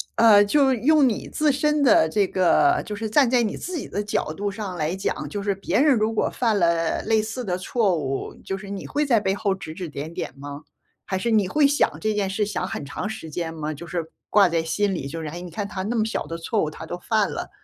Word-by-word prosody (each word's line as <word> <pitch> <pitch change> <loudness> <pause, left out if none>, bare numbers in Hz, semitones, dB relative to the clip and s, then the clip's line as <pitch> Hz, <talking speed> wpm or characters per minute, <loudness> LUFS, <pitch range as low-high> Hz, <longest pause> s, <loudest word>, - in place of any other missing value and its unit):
呃， 220 -3 +7
就 270 +3 +3
用 280 +3 +4
你 220 - -2
自 305 -1 +1
身 300 +2 +1
的 200 -11 +5
这 200 +5 +2
个 350 - +3
就 210 - -5
是 220 +1 -4
站 265 +2 +4
在 245 -1 +3
你 215 - -2
自 365 0 -5
己 - - -6
的 205 - -2
角 205 -6 -1
度 205 +4 -2
上 200 -3 -5
来 155 +3 -1
讲， 190 - -3
就 205 -2 -4
是 200 -1 +1
别 195 +4 0
人 285 -5 +5
如 215 +1 +1
果 - - +1
犯 225 -4 +1
了 170 -2 +1
类 220 -1 +2
似 225 +4 -5
的 180 -5 -2
错 190 -1 +1
误， 135 -2 -3
就 195 - -3
是 195 0 -10
你 200 -1 -6
会 295 +1 0
在 235 -5 +4
背 195 -1 0
后 200 -2 0
指 190 -5 -7
指 175 -1 -6
点 150 +3 -6
点 - - -4
吗？ 145 +1 -8 0.4
还 190 - -2
是 235 +5 -1
你 210 -4 +3
会 295 +6 +4
想 285 +1 +1
这 215 0 0
件 200 -2 0
事 205 +2 0
想 205 -2 -3
很 145 - -5
长 175 - -4
时 220 -7 -7
间 165 +1 -4
吗？ 155 -1 -4
就 160 +4 -9
是， 170 -2 -4 0.2
挂 200 -3 +6
在 165 -1 0
心 195 +4 0
里 140 -5 -4
就， 165 +3 -5
哎 170 +4 -6
你 180 - -8
看 200 +4 -3
他 190 -2 -5
那 225 +4 -2
么 220 -1 +2
小 220 - -3
的 165 - -5
错 185 +5 -1
误， 155 - -1
他 160 - -9
都 175 +2 -5
犯 215 +3 +1
了。 - - -5
200 Hz, 280 characters per minute, -24 LUFS, 170-225 Hz, 0.4 s, 呃